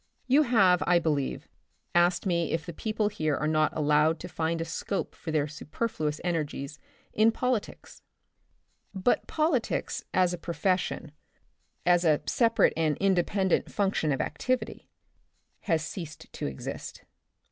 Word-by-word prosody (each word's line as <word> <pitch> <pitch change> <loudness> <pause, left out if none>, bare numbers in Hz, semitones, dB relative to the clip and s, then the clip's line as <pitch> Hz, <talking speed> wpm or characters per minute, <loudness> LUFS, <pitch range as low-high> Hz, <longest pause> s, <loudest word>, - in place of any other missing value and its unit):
You 270 +4 +5
have, 195 -10 +4
I 175 0 +5
believe, 150 -5 -1 0.5
asked 175 +1 +3
me 170 -4 0
if 165 -1 -2
the 170 - -6
people 215 +4 -1
here 155 -8 -1
are 150 - -1
not 155 -1 +2
allowed 150 +1 +3
to 180 - -6
find 165 -1 -2
a 165 - -2
scope 190 +4 -3
for 165 - -8
their 150 -2 +1
superfluous 155 0 -3
energies 150 -4 -3 0.3
in 220 +1 +4
politics. 250 -2 -3 0.9
But 190 +6 +1
politics, 305 -6 0
as 180 -1 +2
a 175 - -5
profession, 175 -2 -1 0.7
as 175 0 +4
a 155 -3 +4
separate 230 -2 +3
and 155 -3 +1
independent 190 0 +1
function 195 -6 0
of 135 - 0
activity, 255 +11 -2 0.8
has 160 -4 +1
ceased 160 -2 -8
to - - -3
exist. 70 - -7
175 Hz, 135 wpm, -28 LUFS, 155-200 Hz, 0.9 s, You